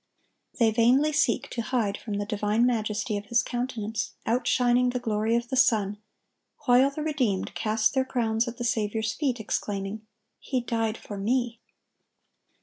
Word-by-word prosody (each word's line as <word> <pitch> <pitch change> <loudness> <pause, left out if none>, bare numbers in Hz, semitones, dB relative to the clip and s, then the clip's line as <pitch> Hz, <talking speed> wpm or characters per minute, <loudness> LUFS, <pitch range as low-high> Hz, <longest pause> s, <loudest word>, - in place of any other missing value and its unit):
They 230 -3 +4
vainly 250 +7 +3
seek 290 -5 +2
to 235 - -2
hide 220 -3 0
from 210 -1 -5
the 205 0 -2
divine 210 +2 +1
majesty 215 -2 0
of 205 - -6
His 235 +2 +2
countenance, 235 -4 -3
outshining 245 +1 +2
the 250 0 -2
glory 220 0 0
of 235 0 -1
the 265 - -1
sun, 215 -5 +3 0.7
while 255 +1 +5
the 300 +2 -5
redeemed 255 -11 -1
cast 220 0 +1
their 265 -1 +2
crowns 230 -3 0
at 235 0 -6
the 240 - -4
Saviour's 220 -1 0
feet, 265 -6 -1
exclaiming, 205 -1 -3 0.4
"He 260 - -2
died 225 -2 -1
for 205 - -8
me!" 235 +2 0
230 Hz, 155 wpm, -27 LUFS, 215-250 Hz, 0.7 s, while